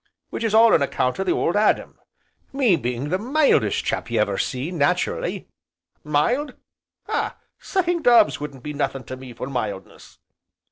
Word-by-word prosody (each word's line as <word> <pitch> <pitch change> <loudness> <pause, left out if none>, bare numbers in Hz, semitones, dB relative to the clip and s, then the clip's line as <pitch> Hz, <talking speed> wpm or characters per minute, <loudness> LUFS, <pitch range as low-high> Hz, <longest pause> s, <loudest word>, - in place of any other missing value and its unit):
Which - - -4
is 220 -1 +1
all 225 0 +7
on - - +4
account 130 +1 -1
o' - - +1
the 185 - 0
Old 170 - 0
Adam, 210 +1 +1 0.5
me 260 -9 +3
being 125 0 -3
the 185 +3 0
mildest 280 +7 +2
chap - - -2
you - - 0
ever - - +1
see, 130 +6 -3
nat'rally, 145 -5 -1 0.6
mild? 240 - 0 0.5
ah! - - -2 0.2
sucking 350 -3 -1
doves 240 -5 +5
wouldn't 140 -4 -8
be 150 - -5
nothin' 140 -2 -2
to 130 - -7
me 130 -1 -11
for 120 - -6
mildness." 110 -8 -6
155 Hz, 160 wpm, -22 LUFS, -, 0.6 s, all